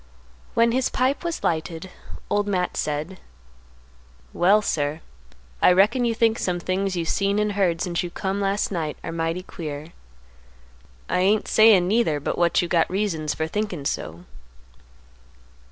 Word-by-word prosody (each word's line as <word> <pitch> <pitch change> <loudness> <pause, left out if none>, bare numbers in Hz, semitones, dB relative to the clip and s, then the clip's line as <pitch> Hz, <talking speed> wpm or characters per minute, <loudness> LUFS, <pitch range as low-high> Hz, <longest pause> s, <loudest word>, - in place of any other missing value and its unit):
When 230 0 +4
his 255 +1 +1
pipe 260 +5 0
was 340 -1 -3
lighted, 165 +2 -2 0.4
Old 205 0 0
Matt 180 -3 -1
said, 155 +5 -3 1.1
"Well, 200 +4 +4
sir, 150 -3 -1 0.6
I - - +6
reckon 220 +7 +3
you 230 -1 0
think 225 0 +2
some 180 -1 -1
things 185 +2 -1
you 170 - -1
seen 200 +4 0
and 210 0 +1
heard 185 -5 0
since 175 -2 -1
you 175 - -4
come 195 +3 -3
last 195 +1 0
night 160 -5 -3
are - - -4
mighty 165 +2 -2
queer. 155 -3 -7 1.1
I - - 0
ain't 205 +3 +2
sayin', 215 -5 +5
neither, 200 -8 +2
but 145 - -2
what 175 0 +2
you - - -2
got 170 -1 +2
reasons 180 -6 -1
for 160 - -1
thinkin' 180 -4 -3
so." 85 - -4
185 Hz, 155 wpm, -23 LUFS, 165-205 Hz, 1.1 s, I